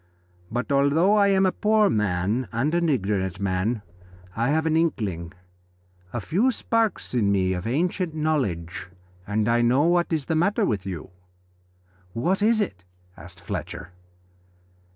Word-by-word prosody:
But 125 Hz, +4 st, -2 dB
although 140 Hz, +8 st, +3 dB
I 205 Hz, -1 st, +4 dB
am 195 Hz, -1 st, +3 dB
a 185 Hz, -, +3 dB
poor 215 Hz, +1 st, +3 dB
man 105 Hz, -, 0 dB
and 130 Hz, +8 st, 0 dB
an 170 Hz, -1 st, +2 dB
ignorant 95 Hz, -, -1 dB
man, 100 Hz, +3 st, -1 dB, 0.5 s
I 115 Hz, +3 st, 0 dB
have 160 Hz, +2 st, +1 dB
an 160 Hz, -1 st, +1 dB
inkling, 105 Hz, -, -1 dB, 0.8 s
a 120 Hz, -, -3 dB
few 185 Hz, -, +1 dB
sparks 230 Hz, -, -1 dB
in 105 Hz, -5 st, +2 dB
me 95 Hz, -2 st, +1 dB
of 90 Hz, +3 st, -4 dB
ancient 170 Hz, +5 st, -1 dB
knowledge, 125 Hz, -, -2 dB, 0.4 s
and 105 Hz, +1 st, 0 dB
I 120 Hz, 0 st, +3 dB
know 125 Hz, +4 st, +3 dB
what 175 Hz, +1 st, +2 dB
is 155 Hz, -4 st, 0 dB
the 160 Hz, -, -1 dB
matter 185 Hz, +6 st, +2 dB
with 100 Hz, -3 st, -2 dB
you." 90 Hz, -1 st, -6 dB, 1.0 s
"What 180 Hz, -, 0 dB
is 220 Hz, +1 st, +3 dB
it?" 95 Hz, -, -3 dB, 0.3 s
asked 85 Hz, +2 st, -11 dB
Fletcher. 90 Hz, -, -6 dB
125 Hz, 150 wpm, -24 LUFS, -, 1.0 s, I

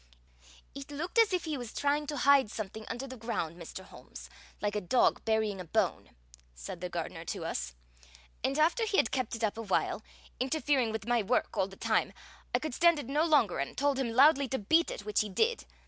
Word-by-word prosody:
"It 275 Hz, 0 st, -8 dB
looked 330 Hz, +9 st, -2 dB
as 450 Hz, -3 st, +5 dB
if 365 Hz, -2 st, -1 dB
he 310 Hz, -3 st, -2 dB
was 240 Hz, -3 st, -8 dB
trying 290 Hz, +1 st, 0 dB
to 295 Hz, 0 st, -3 dB
hide 275 Hz, -3 st, +5 dB
something 215 Hz, +1 st, -6 dB
under 250 Hz, +3 st, -4 dB
the 260 Hz, -1 st, -8 dB
ground, 215 Hz, -8 st, -3 dB
Mr. 175 Hz, +2 st, -9 dB
Holmes, -, -, -12 dB, 0.3 s
like 205 Hz, 0 st, -2 dB
a 210 Hz, -, 0 dB
dog 220 Hz, +7 st, +2 dB
burying 220 Hz, -3 st, 0 dB
a -, -, -5 dB
bone," -, -, 0 dB, 0.5 s
said 60 Hz, -, -8 dB
the 180 Hz, -, -3 dB
gardener 165 Hz, -1 st, -5 dB
to 175 Hz, -3 st, -4 dB
us; 65 Hz, -, -3 dB, 0.7 s
"and 275 Hz, -, 0 dB
after 330 Hz, +9 st, +3 dB
he 405 Hz, -, 0 dB
had 225 Hz, -, +3 dB
kept 255 Hz, -3 st, -1 dB
it 230 Hz, -, -6 dB
up 220 Hz, +1 st, 0 dB
awhile, 215 Hz, -4 st, 0 dB, 0.4 s
interfering 270 Hz, -3 st, +1 dB
with 220 Hz, -1 st, -4 dB
my 240 Hz, 0 st, +2 dB
work 220 Hz, +5 st, 0 dB
all 190 Hz, -, +1 dB
the 195 Hz, -, -13 dB
time, -, -, 0 dB, 0.4 s
I -, -, +3 dB
could 310 Hz, -4 st, -4 dB
stand 340 Hz, +4 st, +4 dB
it 285 Hz, -4 st, -6 dB
no 295 Hz, +3 st, +2 dB
longer 285 Hz, -, +3 dB
and 140 Hz, -, -4 dB
told 280 Hz, -1 st, +1 dB
him 260 Hz, -3 st, 0 dB
loudly 275 Hz, +4 st, +5 dB
to 265 Hz, -, -2 dB
beat 320 Hz, +11 st, +3 dB
it, 205 Hz, -, -6 dB
which 210 Hz, -1 st, +1 dB
he 215 Hz, -, -3 dB
did. 455 Hz, -, 0 dB
245 Hz, 215 wpm, -31 LUFS, 205-290 Hz, 0.7 s, as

